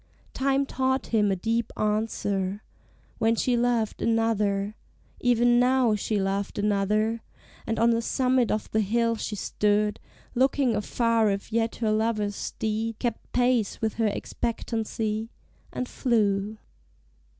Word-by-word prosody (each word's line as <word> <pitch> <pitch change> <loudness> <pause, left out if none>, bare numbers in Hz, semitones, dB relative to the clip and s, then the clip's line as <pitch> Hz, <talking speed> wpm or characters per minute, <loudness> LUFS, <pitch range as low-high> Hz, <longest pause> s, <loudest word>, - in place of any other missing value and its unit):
Time 275 +1 +1
taught 260 -1 0
him 210 -2 +3
a - - +2
deep 230 +4 -1
answer 210 -2 -1 0.6
when 225 +1 +3
she 245 +2 +1
loved 235 -2 0
Another; 215 -3 +1 0.5
even 240 0 +4
now 250 -2 +3
she 210 0 -1
loved 195 +1 -2
another, 210 +2 +1 0.5
And 225 - -1
on 230 +1 +4
the 230 0 +1
summit 255 0 +1
of 215 - -1
the 220 - +2
hill 230 +3 +1
she 215 -1 -4
stood, 210 +1 0 0.3
Looking 260 -1 +2
afar 230 0 +1
if 200 +2 -3
yet 230 0 +1
her 220 -2 0
lover's 215 -2 0
steed 220 +1 -3
Kept 235 -3 -4
pace 245 -4 +1
with 220 -1 -1
her 220 - +3
expectancy, 220 0 -3 0.4
and 250 - -3
flew. 215 -5 0
225 Hz, 130 wpm, -26 LUFS, 210-235 Hz, 0.6 s, even